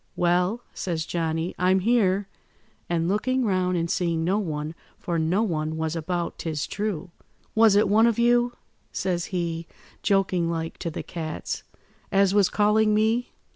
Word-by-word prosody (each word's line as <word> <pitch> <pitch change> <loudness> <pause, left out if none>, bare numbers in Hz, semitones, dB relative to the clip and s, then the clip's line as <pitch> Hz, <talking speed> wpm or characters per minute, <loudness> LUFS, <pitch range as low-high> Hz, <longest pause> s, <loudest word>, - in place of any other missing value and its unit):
"'Well,' 180 +6 +1
says 165 -3 -3
Johnny, 165 0 -2
'I'm 185 +1 +3
here,' 200 -3 +2 0.6
and 170 -1 0
looking 255 +6 +1
round 185 -3 +1
and 170 0 0
seeing 170 -1 0
no 190 +5 +1
one, 155 -5 -3 0.2
for 170 -2 -2
no 175 +7 +2
one 160 -5 -2
was 160 +1 -2
about 170 +1 -3
'tis 155 -3 -2
true. 195 -4 -3 0.4
'Was 220 -2 +5
it 205 - +4
one 220 +3 +5
of 230 - +1
you,' 240 +1 +3 0.4
says 175 -2 -1
he, 170 -3 -3 0.3
joking 190 -4 +1
like, 165 -1 -4
to 170 - -3
the 160 - -5
cats, 160 -3 -5 0.5
'as 195 0 +3
was 200 -2 +4
calling 210 0 +3
me? 220 +3 +1
180 Hz, 155 wpm, -25 LUFS, 165-210 Hz, 0.6 s, Was